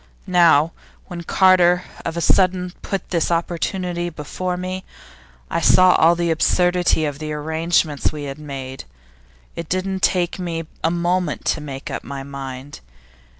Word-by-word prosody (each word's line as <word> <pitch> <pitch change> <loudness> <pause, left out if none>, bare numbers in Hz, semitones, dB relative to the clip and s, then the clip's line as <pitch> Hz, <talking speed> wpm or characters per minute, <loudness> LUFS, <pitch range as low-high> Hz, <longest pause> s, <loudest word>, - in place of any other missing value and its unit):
Now, 165 -3 +4 0.3
when 175 -1 -7
Carter 180 0 +4 0.2
of 165 0 -4
a - - -1
sudden 180 +1 +2
put 195 -2 -4
this 170 -3 +1
opportunity 175 +1 -2
before 180 +4 -4
me, 185 +1 -4 0.6
I 170 - -2
saw 185 +1 +6
all 165 +2 +5
the 170 -1 0
absurdity 175 0 +2
of 145 -1 -4
the 155 -1 -5
arrangements 160 0 0
we 150 -1 -6
had 140 +1 -6
made. 135 -3 -7 0.7
It 170 -2 -6
didn't 190 +1 -1
take 180 0 +1
me 165 -2 -3 0.2
a 165 - +3
moment 175 -1 -1
to - - -7
make 140 -2 -7
up - - -4
my 135 -1 -6
mind. 135 0 -8
170 Hz, 150 wpm, -21 LUFS, 150-180 Hz, 0.7 s, saw